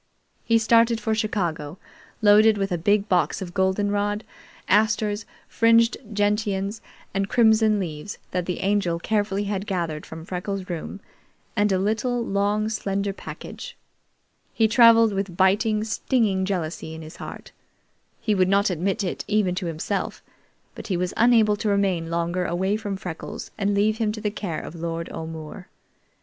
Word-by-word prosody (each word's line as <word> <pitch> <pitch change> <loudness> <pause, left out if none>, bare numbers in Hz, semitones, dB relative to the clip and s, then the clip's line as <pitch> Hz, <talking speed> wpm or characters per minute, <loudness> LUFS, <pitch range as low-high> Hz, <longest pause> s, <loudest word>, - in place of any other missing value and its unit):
He 230 - +3
started 230 +1 +4
for 220 0 -1
Chicago, 180 -8 -2 0.5
loaded 210 +1 +6
with 195 -1 -1
a 175 - +1
big 205 +4 +2
box 180 -3 +1
of 175 -2 -7
goldenrod, 205 +2 0 0.4
asters, 215 +1 +2 0.2
fringed 230 0 +4 0.2
gentians, 205 0 0 0.3
and 195 +1 -1
crimson 220 -2 +4
leaves, 165 +1 -5
that 180 -1 -2
the 180 - -3
Angel 195 -4 +1
carefully 205 +2 -1
had 200 0 -3
gathered 170 -5 -2
from 160 0 -9
Freckles' 185 +1 -4
room, 175 +4 -6 0.5
and 205 0 +2
a 190 - +3
little, 225 +5 0
long 205 +1 0
slender 200 -2 -2
package. 485 - -9 0.8
He 225 - +4
traveled 230 -1 +6
with 195 -3 -3
biting, 210 +3 +3
stinging 215 -3 0
jealousy 165 -4 -3
in 160 - -8
his 155 - -11
heart. - - -9 0.7
He 215 - 0
would 185 -2 +2
not 200 0 +3
admit 185 +4 -1
it 180 - -3
even 205 -3 +2
to 180 -1 -3
himself, 170 +5 -3 0.5
but - - -9
he 185 - 0
was 180 0 -2
unable 225 -3 +4
to 215 0 -1
remain 190 -5 +1
longer 170 +2 -1
away 190 +4 0
from 205 -3 -4
Freckles 175 -4 -7
and 205 -1 0
leave 215 +2 +2
him 220 -2 +1
to 220 - -6
the 210 - -1
care 185 -6 -4
of - - -8
Lord 165 0 -4
O'More. 160 +3 -7
200 Hz, 155 wpm, -24 LUFS, 180-215 Hz, 0.8 s, loaded